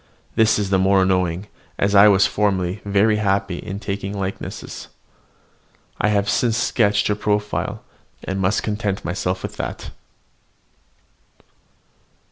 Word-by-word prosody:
This 110 Hz, -1 st, +3 dB
is 100 Hz, -2 st, -2 dB
the 95 Hz, -, +3 dB
more 95 Hz, 0 st, +4 dB
annoying, 90 Hz, 0 st, 0 dB, 0.3 s
as 100 Hz, +1 st, +1 dB
I 100 Hz, +1 st, +8 dB
was 100 Hz, -2 st, +5 dB
formerly 95 Hz, -1 st, 0 dB
very 100 Hz, +2 st, +2 dB
happy 100 Hz, -3 st, 0 dB
in 100 Hz, -1 st, -6 dB
taking 100 Hz, -1 st, -4 dB
likenesses. 95 Hz, 0 st, -6 dB, 1.1 s
I -, -, +2 dB
have 105 Hz, -1 st, +1 dB
since 115 Hz, +1 st, +1 dB
sketched 105 Hz, -3 st, +2 dB
her 105 Hz, -, +2 dB
profile, 105 Hz, 0 st, -2 dB, 0.4 s
and 95 Hz, +1 st, -3 dB
must 95 Hz, +2 st, +1 dB
content 105 Hz, -2 st, -2 dB
myself 90 Hz, +1 st, -2 dB
with -, -, -6 dB
that. -, -, -5 dB
100 Hz, 125 wpm, -21 LUFS, 95-105 Hz, 1.1 s, I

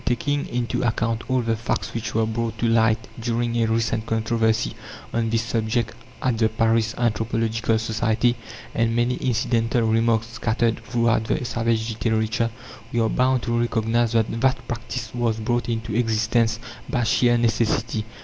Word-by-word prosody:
Taking 145 Hz, +4 st, 0 dB
into 120 Hz, -1 st, -1 dB
account 115 Hz, 0 st, -1 dB
all 130 Hz, -1 st, +2 dB
the 115 Hz, -1 st, 0 dB
facts 115 Hz, +2 st, -3 dB
which 115 Hz, -1 st, -4 dB
were 110 Hz, 0 st, +3 dB
brought 115 Hz, +1 st, -2 dB
to 120 Hz, -, 0 dB
light 115 Hz, -1 st, +3 dB
during 120 Hz, 0 st, -1 dB
a 115 Hz, -, +2 dB
recent 110 Hz, 0 st, 0 dB
controversy 110 Hz, 0 st, +1 dB, 0.4 s
on 115 Hz, -1 st, 0 dB
this 115 Hz, 0 st, +1 dB
subject 115 Hz, 0 st, -1 dB, 0.3 s
at 125 Hz, -3 st, +1 dB
the 110 Hz, -1 st, +3 dB
Paris 110 Hz, 0 st, +1 dB
Anthropological 115 Hz, -1 st, 0 dB
Society, 110 Hz, +2 st, +1 dB, 0.4 s
and 115 Hz, 0 st, +1 dB
many 120 Hz, +1 st, +1 dB
incidental 115 Hz, -1 st, +1 dB
remarks 115 Hz, 0 st, +2 dB
scattered 115 Hz, 0 st, 0 dB
throughout 115 Hz, -1 st, +1 dB
the 125 Hz, -, -1 dB
"savage" 115 Hz, -2 st, 0 dB, 0.2 s
literature, 110 Hz, +1 st, +1 dB, 0.4 s
we 120 Hz, -, 0 dB
are 110 Hz, -1 st, +2 dB
bound 130 Hz, -1 st, +2 dB
to 120 Hz, -1 st, 0 dB
recognize 115 Hz, 0 st, +1 dB
that 115 Hz, 0 st, +1 dB
that 130 Hz, -2 st, +1 dB
practice 120 Hz, 0 st, -5 dB
was 120 Hz, -2 st, 0 dB
brought 120 Hz, +2 st, -1 dB
into 115 Hz, -1 st, -2 dB
existence 115 Hz, 0 st, +1 dB, 0.3 s
by 120 Hz, -, 0 dB
sheer 120 Hz, +1 st, +3 dB
necessity. 115 Hz, -1 st, +1 dB
115 Hz, 155 wpm, -23 LUFS, 110-120 Hz, 0.4 s, were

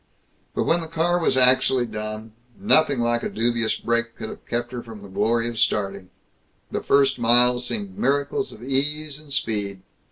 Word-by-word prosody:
But -, -, +1 dB
when 170 Hz, +1 st, +1 dB
the 165 Hz, -, -6 dB
car 165 Hz, +2 st, +1 dB
was 165 Hz, -, +1 dB
actually 130 Hz, 0 st, +4 dB
done, 110 Hz, 0 st, -6 dB, 0.3 s
nothing 155 Hz, -, +3 dB
like 120 Hz, 0 st, +1 dB
a -, -, -3 dB
dubious 115 Hz, 0 st, 0 dB
brake 115 Hz, 0 st, -1 dB
could 110 Hz, -, -6 dB
have -, -, -11 dB
kept 120 Hz, 0 st, -2 dB
her 125 Hz, -1 st, -5 dB
from 110 Hz, -4 st, -11 dB
the -, -, -9 dB
glory 115 Hz, +4 st, 0 dB
of 120 Hz, -2 st, -4 dB
starting. 100 Hz, -2 st, 0 dB, 0.6 s
The -, -, -2 dB
first 140 Hz, -2 st, +3 dB
miles 125 Hz, +1 st, +4 dB
seemed 200 Hz, -2 st, -4 dB
miracles 145 Hz, +7 st, 0 dB
of 110 Hz, -, -12 dB
ease 145 Hz, +3 st, -1 dB
and 150 Hz, -2 st, -16 dB
speed. 105 Hz, -7 st, -2 dB
120 Hz, 180 wpm, -23 LUFS, 115-145 Hz, 0.6 s, actually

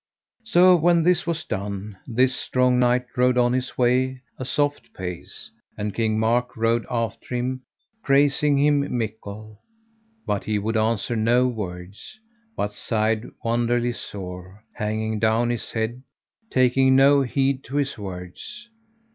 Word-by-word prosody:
So 185 Hz, -4 st, +6 dB
when 170 Hz, 0 st, +3 dB
this 175 Hz, 0 st, +2 dB
was 165 Hz, -1 st, -1 dB
done, 100 Hz, 0 st, -5 dB
this 130 Hz, +2 st, +2 dB
strong 125 Hz, -1 st, +2 dB
knight 125 Hz, 0 st, +2 dB
rode 125 Hz, 0 st, +3 dB
on 120 Hz, 0 st, +3 dB
his 130 Hz, 0 st, -2 dB
way 130 Hz, +1 st, +1 dB, 0.2 s
a 130 Hz, -, -4 dB
soft 145 Hz, +3 st, -1 dB
pace, 90 Hz, -2 st, -6 dB, 0.3 s
and 105 Hz, 0 st, -3 dB
King 110 Hz, -2 st, 0 dB
Mark 115 Hz, +3 st, +1 dB
rode 115 Hz, +1 st, +1 dB
after 115 Hz, +1 st, -3 dB
him, 130 Hz, +1 st, -2 dB, 0.4 s
praising 145 Hz, 0 st, +3 dB
him 145 Hz, -2 st, +2 dB
mickle; 110 Hz, -1 st, -6 dB, 0.6 s
but 100 Hz, -, -2 dB
he 110 Hz, -1 st, 0 dB
would 110 Hz, +3 st, -2 dB
answer 110 Hz, +1 st, 0 dB
no 120 Hz, +3 st, +3 dB
words, 100 Hz, -, -7 dB, 0.4 s
but 105 Hz, -, -1 dB
sighed 110 Hz, +1 st, -1 dB
wonderly 120 Hz, +1 st, +1 dB
sore, 95 Hz, -1 st, -8 dB
hanging 110 Hz, 0 st, -2 dB
down 115 Hz, +2 st, +2 dB
his 120 Hz, -, -3 dB
head, 115 Hz, +2 st, -2 dB, 0.5 s
taking 130 Hz, +1 st, +4 dB
no 140 Hz, +1 st, +6 dB
heed 135 Hz, +1 st, 0 dB
to 135 Hz, -, -7 dB
his 140 Hz, -1 st, 0 dB
words. 100 Hz, -, -8 dB
120 Hz, 140 wpm, -23 LUFS, 110-130 Hz, 0.6 s, So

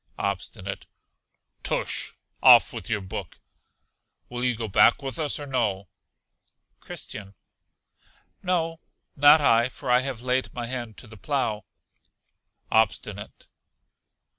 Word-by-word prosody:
Obstinate. 100 Hz, 0 st, -4 dB, 0.7 s
Tush! -, -, 0 dB, 0.3 s
Off -, -, +7 dB
with -, -, -6 dB
your 105 Hz, -3 st, 0 dB
book. 95 Hz, -2 st, -7 dB, 0.9 s
Will 120 Hz, 0 st, -4 dB
you 125 Hz, -1 st, +1 dB
go 110 Hz, 0 st, -4 dB
back 105 Hz, +7 st, +4 dB
with 135 Hz, 0 st, -4 dB
us 150 Hz, -2 st, -1 dB
or 145 Hz, -, -6 dB
no? 105 Hz, -9 st, -1 dB, 0.9 s
Christian. 100 Hz, -2 st, -8 dB, 1.1 s
No, 165 Hz, -3 st, -1 dB, 0.4 s
not 145 Hz, +2 st, +7 dB
I, 120 Hz, -3 st, +4 dB
for 130 Hz, -1 st, -5 dB
I 125 Hz, -, +6 dB
have 130 Hz, -3 st, -4 dB
laid 130 Hz, +1 st, 0 dB
my 120 Hz, -, -3 dB
hand 120 Hz, -3 st, -5 dB
to -, -, -10 dB
the 110 Hz, 0 st, -13 dB
plough. 110 Hz, -5 st, -2 dB, 1.1 s
Obstinate. 105 Hz, -1 st, -1 dB
120 Hz, 115 wpm, -25 LUFS, 105-135 Hz, 1.1 s, Off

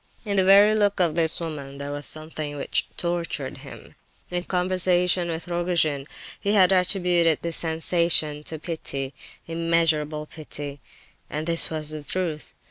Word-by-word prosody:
In 200 Hz, -1 st, -2 dB
the 190 Hz, -, +5 dB
very 200 Hz, +3 st, +6 dB
look 205 Hz, -2 st, +1 dB
of 170 Hz, -4 st, +2 dB
this 160 Hz, -1 st, +1 dB
woman 145 Hz, -5 st, -6 dB
there 140 Hz, 0 st, -6 dB
was 145 Hz, 0 st, -4 dB
something 155 Hz, -1 st, -4 dB
which -, -, 0 dB
tortured 170 Hz, -6 st, -3 dB
him. -, -, -12 dB, 0.4 s
In 175 Hz, 0 st, -2 dB
conversation 180 Hz, -1 st, +1 dB
with 165 Hz, +1 st, -5 dB
Rogojin 170 Hz, -5 st, +1 dB, 0.3 s
he 200 Hz, -, -1 dB
had 190 Hz, -3 st, +5 dB
attributed 180 Hz, -3 st, +2 dB
this 170 Hz, -1 st, +2 dB
sensation 160 Hz, -2 st, +2 dB
to 160 Hz, -, -5 dB
pity—immeasurable 155 Hz, +1 st, -2 dB
pity, 145 Hz, -2 st, -8 dB, 0.5 s
and 155 Hz, +1 st, -4 dB
this 165 Hz, 0 st, +5 dB
was 155 Hz, -1 st, -3 dB
the 155 Hz, -1 st, -6 dB
truth. 160 Hz, -2 st, -4 dB
165 Hz, 140 wpm, -24 LUFS, 150-180 Hz, 0.5 s, very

